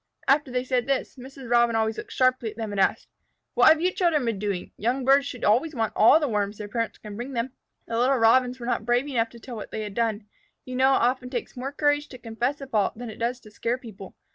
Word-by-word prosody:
After 285 0 +3
they 250 0 -1
said 255 -1 -1
this, 275 -1 -1
Mrs. 265 0 -11
Robin 235 -1 +3
always 220 0 0
looked - - -9
sharply 255 -3 +2
at 215 - -12
them 220 -2 -4
and 200 -1 0
asked, - - +1 0.5
"What - - +5
have 315 - +5
you 365 +1 +2
children 335 -8 +1
been 225 -4 -1
doing? 200 -3 -3
Young 245 +5 -1
birds 275 +1 +4
should 250 - -7
always 265 +9 +2
want 225 -2 -1
all 230 +8 +6
the 300 - 0
Worms 205 -3 -1
their 210 - -6
parents 230 +2 -3
can 210 -2 -9
bring 245 +5 -6
them." 240 +1 -2 0.3
The 230 0 -2
little 260 +2 +3
Robins 250 +2 +3
were 235 - -6
not 240 - -1
brave 245 +4 +1
enough 235 -5 0
to 235 - -14
tell 240 +1 -9
what 215 - -7
they 220 - -4
had 205 -1 -6
done. 225 -2 -1 0.4
You 255 - -6
know 265 +1 +4
it - - +1
often 250 +1 0
takes 245 -2 -5
more 260 +2 -4
courage 290 0 +1
to 255 - -10
confess 245 +4 -3
a - - -5
fault 215 -5 0
than 240 -1 -6
it 215 - -12
does 240 +2 -1
to 215 - -15
scare 230 +3 -2
people. 210 -6 -11
240 Hz, 260 wpm, -25 LUFS, 225-265 Hz, 0.5 s, all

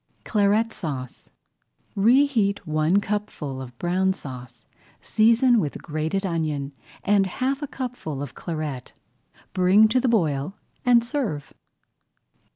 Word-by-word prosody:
CLARET 215 +2 +2
SAUCE 135 -8 -6 0.7
Reheat 225 -2 +3
one 155 +4 +2
cupful 180 -11 -4
of 125 -2 -10
Brown 185 +2 +1
Sauce, 125 -8 -10 0.3
season 230 +2 +4
with 150 -8 -3
grated 160 +5 -2
onion, 155 -5 -2 0.3
add 200 -1 +3
half 265 +8 -2
a 290 - -3
cupful 245 - -5
of 140 - -8
Claret, 155 -6 -5 0.6
bring 185 +4 +5
to 255 - +3
the 255 0 +1
boil, 165 -4 0 0.3
and 240 -2 +5
serve. 235 - -3
190 Hz, 115 wpm, -24 LUFS, 150-225 Hz, 0.7 s, bring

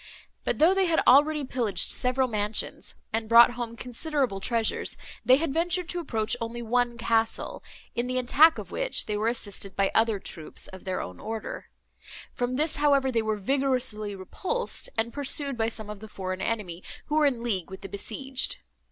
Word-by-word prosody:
But, - - 0
though 330 +5 +6
they 385 -1 +2
had 330 -1 +3
already 295 +3 +5
pillaged 230 -8 0
several 255 +1 +1
mansions, 210 -1 -2 0.2
and 220 0 -1
brought 235 +1 +8
home 240 -1 -5
considerable 255 -2 -2
treasures, 225 +2 -1 0.3
they 255 - +7
had 290 0 -1
ventured 350 +2 0
to 355 - -1
approach 225 -10 -1
only 235 +1 -4
one 240 +1 +1
castle, 225 - 0 0.3
in 240 +1 -1
the 255 0 -1
attack 295 +6 +5
of - - -8
which - - 0
they 210 - -2
were 215 +2 0
assisted 200 -4 -1
by 195 0 +2
other 225 -1 +3
troops 165 -4 -5
of 190 0 -12
their 185 -1 -2
own 90 0 -8
order; 220 0 -5 0.7
from 245 +1 -1
this, 305 +3 0
however, 280 -2 +3
they 230 -2 +1
were 220 -1 -1
vigorously 250 -3 0
repulsed, 380 - -2
and 225 +1 0
pursued 285 -1 -1
by 225 -1 0
some 220 -2 -6
of 210 -1 -7
the 220 - -9
foreign 185 -2 -5
enemy, 190 -6 -3 0.2
who - - -5
were 300 -1 +5
in 245 -4 -1
league 200 -7 -1
with 190 0 -9
the 195 - -6
besieged. 250 +7 -2
235 Hz, 185 wpm, -27 LUFS, 210-275 Hz, 0.7 s, brought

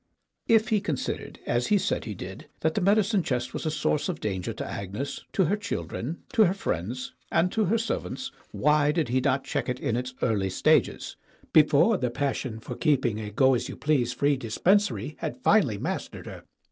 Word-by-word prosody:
If 225 0 +4
he 215 -3 +2
considered, 150 -8 -3
as 120 0 0
he 210 - +4
said - - -1
he 105 -3 -5
did, 95 +1 -8
that 160 0 +1
the 205 - 0
medicine 200 +1 +3
chest 125 -5 -2
was - - -3
a - - +2
source 155 +1 0
of 180 - -3
danger 95 -4 -2
to - - -5
Agnes, 105 +9 -5
to 195 - +3
her 185 +6 +2
children, 175 - -4
to 225 -4 +6
her 185 +1 +1
friends, 120 - -3 0.2
and 180 +2 +2
to 220 -2 +1
her 215 +6 +2
servants, 260 +4 -3 0.2
why 150 0 +3
did 155 -5 0
he 130 +2 +2
not 130 +1 +1
check - - -2
it 125 0 -2
in 115 - -1
its 125 +1 -3
early 100 -5 +1
stages 95 - +1 0.4
before 155 +8 +5
the 125 - -1
passion 130 -3 -2
for - - -7
keep 145 -5 +1
ing 110 -3 0
a 105 -1 -5
go 130 +5 +4
as 125 - -1
you - - -7
please 135 -5 +1
free 140 +3 +1
dispensary 185 - +1
had - - -4
finally - - +4
mas - - -3
tered - - -10
her? - - -9
140 Hz, 205 wpm, -27 LUFS, 120-185 Hz, 0.4 s, to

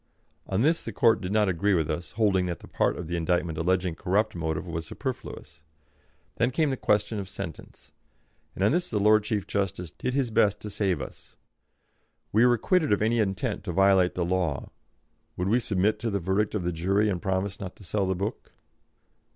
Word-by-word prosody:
On 95 +4 +1
this 165 +3 +3
the - - -6
Court 115 -5 +3
did 90 0 -4
not 105 -1 +3
agree 95 +2 +2
with 80 -3 +1
us, 85 +3 -5
holding 100 -4 +2
that 85 -2 -4
the - - -12
part - - 0
of 90 - -5
the 85 - -2
indictment 85 -1 0
alleging 90 +1 +1
corrupt 100 +6 0
motive 80 -1 -3
was 80 -2 -5
superfluous. 75 - -6 0.8
Then 115 - +2
came 150 +2 +1
the - - 0
question 105 -2 +1
of 95 -2 -6
sentence, 85 -5 -9 0.6
and 95 - -2
on 100 - +4
this 175 +3 0
the 105 - 0
Lord 105 +1 +5
Chief 105 -2 -2
Justice 90 -4 -2
did 125 - -3
his 130 -4 0
best 105 -2 +3
to 105 - -6
save 95 -8 0
us; - - -12 1.0
we 110 +3 +4
were 120 - +5
acquitted 155 - +1
of 105 +1 +3
any 115 +2 +2
intent 95 -3 -1
to - - -2
violate 95 -1 +4
the 90 - 0
law; 90 -5 -1 0.7
would 90 +2 -1
we 120 +4 +4
submit 105 -1 +1
to 115 +1 -2
the 100 - 0
verdict 95 +4 0
of 100 - -1
the 90 0 -1
jury 95 +6 +1
and 90 -4 -1
promise 95 +2 -1
not 95 -2 -6
to - - -15
sell 100 +1 -1
the 95 - 0
book? 100 +6 -5
100 Hz, 205 wpm, -27 LUFS, 90-110 Hz, 1.0 s, Lord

